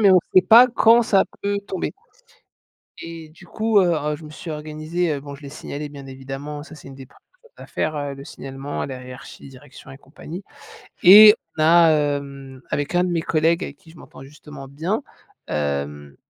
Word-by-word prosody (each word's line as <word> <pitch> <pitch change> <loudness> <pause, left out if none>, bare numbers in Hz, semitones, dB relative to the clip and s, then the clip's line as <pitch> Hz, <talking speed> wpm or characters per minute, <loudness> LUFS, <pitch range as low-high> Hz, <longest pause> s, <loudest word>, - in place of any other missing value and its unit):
mais 200 -2 +5
on 185 - +7 0.2
sait 185 - +7
pas 230 +7 +7
quand 230 0 +4
ça 205 -5 +2 0.2
peut 200 0 -1
tomber. 190 - -4 1.1
Et 165 -1 -9
du 170 +3 -18
coup, 220 +3 +1
heu 175 -2 +2
heu, 150 -1 -2
je 155 - -14
me 150 - -11
suis 160 +2 -9
organisée. 155 +2 -3
Heu, 140 - -5
bon 140 0 -10
je 145 - -14
l'ai 140 - -9
signalé 150 0 -7
bien 140 -2 -11
évidemment, 135 +3 -8
ça 155 - -13
c'est 150 - -13
une 135 - -11
des 135 -1 -12
1re - - -25 0.2
choses 475 - -23
à - - -12
faire, 155 0 -3
heu, 145 -1 -4
le 135 0 -11
signalement 135 +1 -7
à - - -3
la 130 -2 -8
hiérarchie, 125 +2 -12
direction 135 +1 -15
et 135 - -12
compagnie. 160 +6 -10 0.6
Et 210 +4 +10 0.2
on 155 - +1
a, 165 +1 +6
hem, 140 -3 -3
avec 145 +4 -3
un 180 - +3
de 180 - -1
mes 170 -2 -1
collègues 165 +1 +1
avec 140 - -8
qui 160 - -19
je 165 - -18
m'entends, 135 - -14
justement, 145 -1 -12
bien. 165 - -3 0.4
Hem, 70 -1 -4
150 Hz, 210 wpm, -21 LUFS, 140-175 Hz, 1.1 s, Et